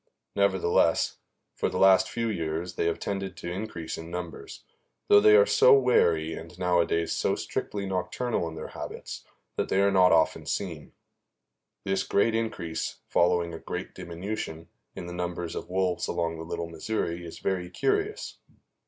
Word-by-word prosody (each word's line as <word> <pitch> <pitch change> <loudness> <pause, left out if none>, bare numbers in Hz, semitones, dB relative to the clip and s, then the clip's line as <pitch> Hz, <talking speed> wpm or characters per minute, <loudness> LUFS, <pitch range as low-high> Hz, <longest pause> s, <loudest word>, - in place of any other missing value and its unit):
Nevertheless, 95 -4 +2 0.4
for - - -1
the - - -3
last 95 -1 +5
few 115 -1 -2
years 85 -3 -3
they 85 - -1
have 85 - 0
tended 95 -2 -4
to 85 0 -5
increase 90 -5 -5
in 80 +1 -8
numbers, 90 -1 -7 0.5
though 100 - +8
they 105 +1 +7
are 100 - +7
so 135 +2 +6
wary, 85 -11 +3
and 85 +2 -9
nowadays 85 -2 +1
so - - +1
strictly 100 -1 -4
nocturnal 95 +2 -1
in 80 - -7
their - - -7
habits, - - -7 0.3
that - - -1
they 95 - +2
are 100 0 +4
not 95 -1 +5
often 80 -1 +2
seen. 85 -7 -4 0.9
This 95 0 0
great 100 +3 +2
increase, 100 -8 -3
following 85 -1 +2
a 80 - -6
great 90 - -6
diminution, 85 -2 -6 0.3
in 90 - -6
the 90 - -7
number 90 0 -3
of 85 0 -5
wolves 90 -1 0
along 85 -1 -1
the 80 - -7
Little 85 0 -4
Missouri 85 0 -3
is 85 - -8
very 90 -2 -2
curious. 410 - -1
90 Hz, 160 wpm, -27 LUFS, 85-100 Hz, 0.9 s, though